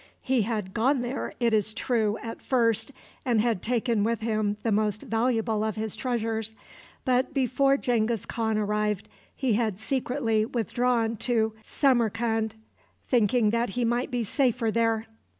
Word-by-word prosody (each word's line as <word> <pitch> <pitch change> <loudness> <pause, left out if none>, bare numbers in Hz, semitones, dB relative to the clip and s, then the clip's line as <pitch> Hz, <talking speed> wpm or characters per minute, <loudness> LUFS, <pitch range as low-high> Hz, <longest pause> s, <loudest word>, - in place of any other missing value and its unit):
He 260 -2 +2
had 210 -3 -2
gone 255 +4 +2
there, 245 +2 -4
it 235 -2 +2
is 215 0 +1
true, 220 -3 0
at 225 - -6
first, 235 -1 +2 0.3
and 240 -4 +2
had 225 -4 +1
taken 235 -2 +1
with 230 0 0
him 215 -2 0
the 225 - +1
most 210 +1 +1
valuable 225 -2 0
of 220 -1 -1
his 220 -1 -3
treasures, 225 -3 -2 0.5
but 255 +3 +1
before 275 +1 +3
Genghis 230 -4 0
Khan 220 -2 -1
arrived 210 -1 -1 0.3
he 260 -4 0
had 215 -3 0
secretly 240 -1 0
withdrawn 230 0 0
to 220 -1 +1
Samarcand, 225 -3 +1 0.5
thinking 230 -2 +3
that 235 0 0
he 240 +4 -1
might 240 +2 0
be 245 -2 -1
safer 235 0 +1
there. 225 -1 +1
225 Hz, 150 wpm, -27 LUFS, 215-245 Hz, 0.5 s, before